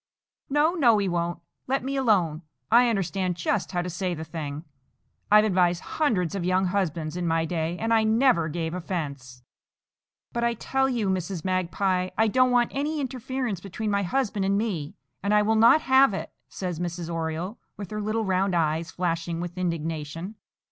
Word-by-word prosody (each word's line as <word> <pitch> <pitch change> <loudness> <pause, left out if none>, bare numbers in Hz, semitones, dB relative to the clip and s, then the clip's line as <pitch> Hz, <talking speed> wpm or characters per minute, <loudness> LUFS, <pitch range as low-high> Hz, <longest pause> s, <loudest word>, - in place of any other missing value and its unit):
"No, 295 +4 +3
no, 245 -11 +4
he 200 -1 0
won't. 175 -1 -2 0.3
Let 270 -1 0
me 275 +1 -2
alone. 190 - +2 0.3
I 240 +1 +6
understand 190 -3 -1
just 185 +3 -1
how 175 -2 -1
to 180 - -4
say 180 0 -2
the 160 - -6
thing. 150 -2 -6 0.7
I've 210 +1 +7
advised 180 -3 +2 0.2
hundreds 200 - +2
of 195 -3 -2
young 185 +1 +2
husbands 170 -4 -1
in 180 -1 -2
my 165 0 +1
day, 165 0 -2
and 225 +3 0
I 220 -1 +4
never 220 -7 +3
gave 160 +1 -3
offence." 140 -9 -5 0.9
"But 235 - -1
I 235 0 +1
tell 265 +4 0
you, 235 -5 -1
Mrs. 185 -2 -2
Magpie, 185 0 0
I 220 - +4
don't 255 +4 +3
want 245 -1 +2
any 295 +3 -1
interference 255 - -3
between 205 +3 -4
my 200 0 +1
husband 205 +1 -1
and 195 +1 +2
me, 190 -10 -2 0.3
and 200 +2 +1
I 210 - +5
will 220 +2 +2
not 230 +8 +6
have 265 -6 +5
it," - - -5 0.2
says 180 -4 -4
Mrs. 175 -1 -4
Oriole, 165 +4 -3 0.2
with 200 -2 -7
her 210 0 -3
little 215 +1 -1
round 190 -1 +1
eyes 160 0 0
flashing 170 -1 -2
with 175 0 -5
indignation. 165 0 -3
185 Hz, 180 wpm, -26 LUFS, 170-220 Hz, 0.9 s, I've